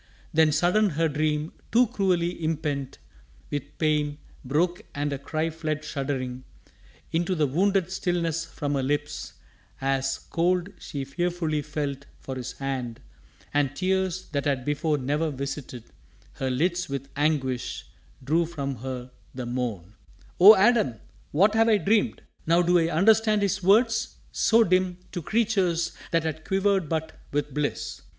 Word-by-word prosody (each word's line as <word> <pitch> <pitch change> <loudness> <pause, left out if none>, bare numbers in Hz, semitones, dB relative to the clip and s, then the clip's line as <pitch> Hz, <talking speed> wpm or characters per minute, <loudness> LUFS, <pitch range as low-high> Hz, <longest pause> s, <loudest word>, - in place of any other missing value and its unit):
Then 160 -1 +5
sudden 180 +7 +3
her 165 0 +1
dream, 150 +1 -1 0.2
too 245 +2 +5
cruelly 180 -7 0
impent 150 -4 -2 0.5
With 145 0 -5
pain, 150 -2 +1 0.3
broke 165 +7 0
and 145 0 -1
a 140 - -4
cry 155 +3 -2
fled 155 -1 -3
shuddering 130 -3 -3 0.7
Into 175 +3 0
the 155 -3 +2
wounded 185 +5 +1
stillness 170 -3 -1
from 145 -3 -4
her 140 - +1
lips 145 +2 -2 0.5
As, 135 0 0
cold, 180 +2 +1
she 140 -2 -5
fearfully 165 0 -1
felt 145 -2 -4
for 135 - -6
his 130 -1 -5
hand, 130 -3 -4 0.5
And 145 -2 +1
tears, 185 +1 0
that 140 -1 -1
had 135 -4 0
before 150 +1 0
ne'er 145 +4 0
visited 135 -3 -5 0.5
Her 130 - -2
lids 175 +6 0
with 135 0 -4
anguish, 140 -4 -1 0.4
drew 160 +5 +2
from 140 -5 -4
her 125 +1 -6 0.2
the 125 -1 -4
moan: 120 -7 -3 0.5
"Oh, 205 +5 +11
Adam! 200 - +3 0.4
What 200 +8 +4
have 225 +1 +4
I 215 - +5
dreamed? 210 +5 +1 0.2
Now 170 +2 +4
do 175 0 +4
I 165 - +2
understand 215 +5 +4
His 200 0 0
words, 220 +5 +3 0.2
so 230 0 +4
dim 185 -2 +1
To 175 - -4
creatures 190 -5 +1
that 165 -1 +1
had 160 0 -3
quivered 195 -4 +1
but 160 -1 -3
with 145 -1 -1
bliss! 150 0 -2
155 Hz, 145 wpm, -26 LUFS, 140-180 Hz, 0.7 s, Oh